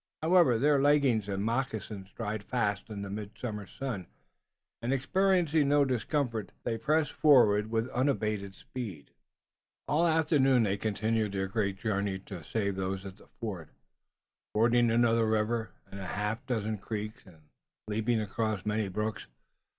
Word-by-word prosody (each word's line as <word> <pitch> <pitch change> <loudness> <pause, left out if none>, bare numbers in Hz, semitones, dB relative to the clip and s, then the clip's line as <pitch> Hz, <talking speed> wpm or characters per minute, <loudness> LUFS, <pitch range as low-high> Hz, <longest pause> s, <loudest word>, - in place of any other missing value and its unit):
However, 165 -8 +5
their 140 +3 +3
leggings 135 -8 +3
and 100 +1 -1
moccasins 110 -5 -3
dried 110 -2 -3
fast 105 -2 -1
in 100 -2 -5
the 100 - -5
midsummer 105 0 -5
sun, 120 -9 -5 0.7
and, 120 +2 -1
experiencing 165 +1 +2
no 145 0 +4
discomfort, 125 - -1
they 115 -2 -2
pressed 155 +4 +1
forward 110 -8 +5
with 115 +1 0
unabated 105 -7 -1
speed. 100 - -7 0.8
All 160 +3 +2
the - - +4
afternoon 145 -6 +3
they 100 -2 +1
continued 110 0 0
their 95 -1 0
great 100 0 -1
journey 100 -2 -1
to 95 -3 -9
save 100 +2 -2
those 95 +1 -3
at 95 0 -8
the - - -19
fort, 95 -9 -5 0.9
fording 120 +2 +4
another 115 -1 +3
river 110 0 0 0.2
and 100 - -7
a 95 - -5
half 105 +6 -2
dozen 110 -4 -1
creeks 105 +1 -5
and 90 -4 -16 0.5
leaping 110 +2 0
across 110 -2 -2
many 105 0 0
brooks. 105 +3 -3
110 Hz, 145 wpm, -30 LUFS, 100-125 Hz, 0.9 s, However